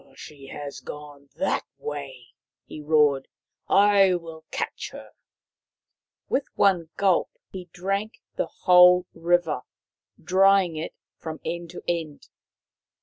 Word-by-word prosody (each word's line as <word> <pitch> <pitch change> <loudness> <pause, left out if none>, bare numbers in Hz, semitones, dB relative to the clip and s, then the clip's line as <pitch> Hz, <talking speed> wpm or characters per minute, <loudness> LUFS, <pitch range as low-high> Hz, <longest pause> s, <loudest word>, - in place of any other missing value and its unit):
" - - -22
She 140 -2 -12
has 140 -1 -7
gone 145 +1 -10
that - - 0
way! 135 -4 -7 0.2
" - - -68
he 155 - -9
roared. 150 -3 +3 0.3
" - - -54 0.3
I 195 -2 +5
will 165 -2 -8
catch - - -4
her." - - -12 1.2
With 275 - 0
one 180 -5 +2
gulp 190 -3 +2 0.2
he 185 -2 -7
drank 195 +5 -3 0.2
the - - -1
whole 180 0 +5
river, 170 -5 +1 0.6
drying 190 0 +3
it 155 +1 -5 0.2
from 160 -1 -6
end 170 +1 -4
to 175 - -10
end. 165 -4 -4
165 Hz, 130 wpm, -25 LUFS, 150-180 Hz, 1.2 s, I